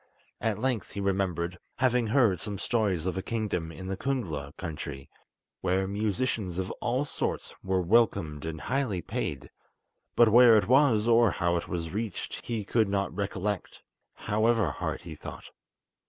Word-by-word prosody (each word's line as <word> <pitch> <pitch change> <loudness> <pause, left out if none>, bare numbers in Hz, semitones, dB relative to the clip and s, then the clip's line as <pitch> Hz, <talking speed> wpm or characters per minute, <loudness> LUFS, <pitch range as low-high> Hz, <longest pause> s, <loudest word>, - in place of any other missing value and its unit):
At 110 -3 0
length 125 -1 -1
he - - -4
remembered 90 -3 -1 0.2
having 125 -2 +2
heard 110 - +3
some 100 -1 -4
stories 100 -7 0
of 95 0 -1
a - - -2
kingdom 100 -7 -2
in 95 +3 -9
the 95 +1 -2
Kungla 90 - -3
country, 75 -5 -6 0.5
where 95 +1 +1
musicians 105 -2 -1
of 95 0 -2
all 125 +4 0
sorts - - -3
were 95 -1 0
welcomed 85 -7 +2
and 80 -1 -5
highly 125 - -1
paid; 70 -4 -4 0.6
but 120 -2 +6
where 120 0 +8
it 105 - +1
was, 125 -4 +4
or 115 -1 +6
how 85 -2 0
it 85 - -2
was 85 -2 -3
reached, 105 -2 -4
he 115 -4 -3
could 110 -1 +2
not 100 0 -1
recollect, 100 -1 -3 0.3
however 110 -4 +1
hard - - -3
he 85 - -8
thought. 75 - -9
100 Hz, 155 wpm, -28 LUFS, 90-115 Hz, 0.6 s, where